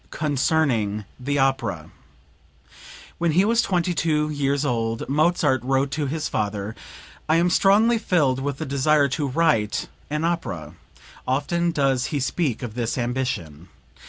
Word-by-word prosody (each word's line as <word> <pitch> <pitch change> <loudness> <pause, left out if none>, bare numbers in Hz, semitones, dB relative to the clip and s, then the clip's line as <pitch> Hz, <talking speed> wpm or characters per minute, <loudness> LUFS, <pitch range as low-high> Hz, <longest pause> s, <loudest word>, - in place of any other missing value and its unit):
CONCERNING 135 -8 0
THE 145 +3 -1
OPERA 135 -5 0 1.3
When 170 -2 +1
he 185 +5 +4
was 230 +2 +3
twenty 180 -4 0
two 150 -1 0
years 140 0 0
old 115 -3 -1
Mozart 150 -2 +2
wrote 135 +1 +1
to 150 0 -2
his 155 +2 -2
father, 105 0 -3 0.5
"I 155 - +4
am 175 +1 +3
strongly 220 +6 +4
filled 150 - +1
with 140 0 -3
the - - -4
desire 140 +2 +2
to 145 +2 -1
write 135 -7 +1 0.2
an 150 +2 -1
opera." 90 - -3 0.5
Often 170 +6 0
does 135 -4 +1
he 145 - -2
speak 135 -2 -1
of 115 -3 -5
this 120 +1 -2
ambition. 120 - -3
140 Hz, 140 wpm, -23 LUFS, 125-160 Hz, 1.3 s, he